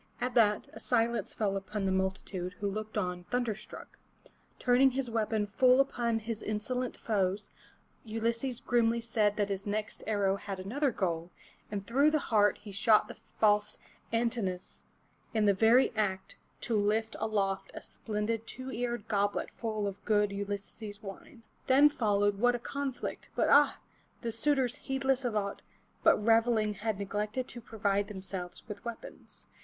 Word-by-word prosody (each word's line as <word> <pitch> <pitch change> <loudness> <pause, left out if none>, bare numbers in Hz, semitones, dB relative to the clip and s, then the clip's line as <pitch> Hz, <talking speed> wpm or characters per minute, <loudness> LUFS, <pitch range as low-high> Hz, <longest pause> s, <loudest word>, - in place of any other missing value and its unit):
At 250 0 -1
that, 210 -3 +3
a - - -9
silence 235 -1 0
fell 200 -3 0
upon 195 +1 -3
the 190 - +1
multitude, 190 -1 -2
who 200 +3 -3
looked 215 +2 -4
on 180 -3 -2
thunder 245 -1 0
struck, 215 - -12 0.6
Turning 250 +2 +5
his 260 -2 -3
weapon 220 -1 0
full 250 +5 +4
upon 240 -4 +1
his 225 0 -4
insolent 245 +4 -3
foes, 200 -2 -1 0.5
Ulysses 230 +3 -2
grimly 235 -1 +2
said 215 -3 +1
that 205 -1 +1
his 195 +1 -3
next 210 +1 -3
arrow 200 -2 +1
had 195 -1 -6
another 265 +10 0
goal, 175 -6 -2 0.4
and 200 -2 -4
through 275 +7 +4
the 310 - +2 0.2
heart 205 -2 +4
he 205 -1 -10
shot 210 +2 +4
the - - -9 0.2
false 210 -1 +3 0.3
An 230 0 +2
tin'o 200 -7 -1
us 180 - -17 0.5
in 215 -1 +3
the 200 - +5
very 230 +6 +5
act 195 -3 -1 0.3
to 230 - -1
lift 215 +2 +1
aloft 195 -3 -1
a - - -4
splendid 220 +1 -3
two 260 +1 -6
eared 240 -2 -3
goblet 205 -1 0
full 215 -3 -3
of 200 0 -5
good 210 -1 +2
Ulysses' 205 +1 -6
wine. 225 +5 -10 0.2
Then 280 +3 +7
followed 205 -7 +1
what 245 +2 +4
a - - -3
conflict! 275 +1 -4
But - - +2
ah! - - +5 0.4
the 235 - -2
suitors 265 -1 +1
heedless 270 -1 0
of 240 -3 -1
aught 200 -1 -2 0.4
but - - +6
reveling 225 0 +3
had 210 +1 -2
neglected 210 +5 -2
to 240 - -7
provide 205 -2 0
themselves 190 -3 -7
with 210 -2 -8
weapons. 235 -1 -9
215 Hz, 160 wpm, -31 LUFS, 200-235 Hz, 0.6 s, Then